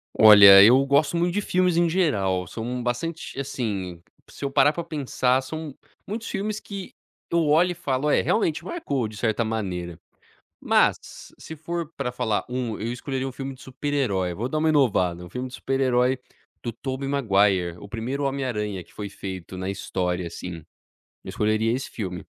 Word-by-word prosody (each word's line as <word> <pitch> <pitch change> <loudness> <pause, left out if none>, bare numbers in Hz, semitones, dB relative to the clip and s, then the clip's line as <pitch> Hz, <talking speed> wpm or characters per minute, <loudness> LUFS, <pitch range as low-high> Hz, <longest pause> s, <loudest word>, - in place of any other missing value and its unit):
Olha, 100 -2 +10
eu 130 +5 +6
gosto 145 +4 +2
muito 175 +1 +1
de 205 - 0
filmes 180 -2 +1
em 170 -1 +3
geral, 100 - +1
são 120 +6 -5
bastante 140 +6 -3
assim, 105 -10 -4 0.3
se - - -7
eu 140 - -2
parar 140 +1 +5
pra 170 +2 -5
pensar, 135 -4 0
são 155 +1 -7 0.3
muitos 220 +3 -5
filmes 215 +1 -3
que 200 -2 -8 0.4
eu 170 -1 +3
olho 165 +5 +4
e - - -2
falo: 140 -4 -2
"É, - - +4
realmente 170 -8 0
marcou, 140 - -2
de 105 0 -10
certa 115 0 0
maneira." 90 -7 -4 0.6
Mas, - - 0
se 160 - -9
for 165 +1 -4
pra 125 - -3
falar 110 -3 -1
um, 125 -3 -3
eu 115 +3 -3
escolheria 130 +1 -3
um 135 - -5
filme 135 +1 -6
de 130 - -16
super-herói, 125 -10 -1
vou 110 +7 -3
dar 155 +4 -2
uma 160 +1 +2
inovada, 95 - +2
filme 125 +1 -4
de 125 - -13
super-herói 130 -1 +1 0.4
do 120 - -3
Tobey 130 +3 -5
Maguire, 100 -9 +2
o 100 - -10
primeiro 125 +7 -3
Homem 140 0 -1
Aranha 105 -7 -3
que - - -24
foi 105 -1 -6
feito 95 -2 -7
na 95 +1 -3
história, 90 -2 -2
assim. 85 +1 -6 0.7
Eu - - -12
escolheria 110 +1 +1
esse 130 - -4
filme. 90 -6 -5
125 Hz, 175 wpm, -24 LUFS, 100-145 Hz, 0.7 s, Olha